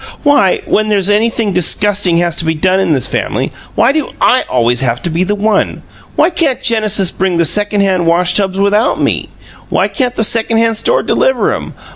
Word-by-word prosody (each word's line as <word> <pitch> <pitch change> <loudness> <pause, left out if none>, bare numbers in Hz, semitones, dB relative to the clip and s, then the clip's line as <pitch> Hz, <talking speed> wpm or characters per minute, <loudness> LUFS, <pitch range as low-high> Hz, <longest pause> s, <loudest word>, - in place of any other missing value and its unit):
WHY, 285 - +2
when 215 0 0
there's 200 -1 +1
anything 220 -1 0
disgusting 180 +1 +1
has 170 -1 0
to - - +1
be 160 0 -1
done 185 +4 +1
in 190 -3 0
this 135 -5 +1
family - - -2 0.2
why 235 +4 +3
do 305 -1 -2
I 255 - +3
always 120 0 +1
have 120 -2 0
to 170 - -2
be 170 +3 0
the 205 +3 -1
one? 210 0 -1 0.3
Why 325 +4 +2
can't 320 -7 0
Genesis 215 -6 +1
bring 185 -2 -1
the 170 - +2
second 205 +4 +1
hand 185 -3 0
wash 175 +1 +2
tubs 195 -1 0
without 205 +3 +1
ME? - - -1 0.4
Why - - +1
can't 250 -4 -3
the 220 - 0
second 225 +1 +1
hand 225 -1 +1
store - - +1
deliver - - 0
'em? - - -7
200 Hz, 200 wpm, -12 LUFS, 175-225 Hz, 0.4 s, why